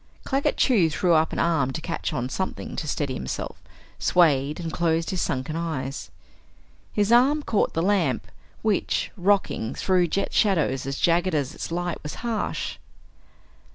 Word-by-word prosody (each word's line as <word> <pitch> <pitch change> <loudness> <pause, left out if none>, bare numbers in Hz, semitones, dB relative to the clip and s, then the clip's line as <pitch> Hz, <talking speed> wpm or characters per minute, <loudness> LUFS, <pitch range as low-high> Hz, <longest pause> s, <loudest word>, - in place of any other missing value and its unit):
Claggett 275 +1 0
Chew 205 -11 +4
threw 175 +3 +2
up 160 0 +3
an - - -4
arm 160 -6 +2
to - - -3
catch 165 +1 -3
on 125 -5 -2
something 190 +8 -4
to 155 - -4
steady 145 -2 -1
himself, 65 - -5 0.4
swayed 150 -4 +3
and 165 -2 -4
closed 165 +1 +1
his 185 -2 -1
sunken 135 +4 -2
eyes. 140 - -3 0.8
His 210 +1 +1
arm 275 +5 +5
caught 215 - 0
the 165 - +1
lamp, 180 - +1 0.4
which, 215 -3 0
rocking, 185 - +1
threw 180 -2 +2
jet 195 +4 -1
shadows 155 -10 +2
as 135 - -3
jagged 175 +1 +2
as 145 -1 -1
its - - -6
light 175 0 -2
was 150 - -6
harsh. 225 -3 -2
165 Hz, 155 wpm, -25 LUFS, 150-195 Hz, 0.8 s, arm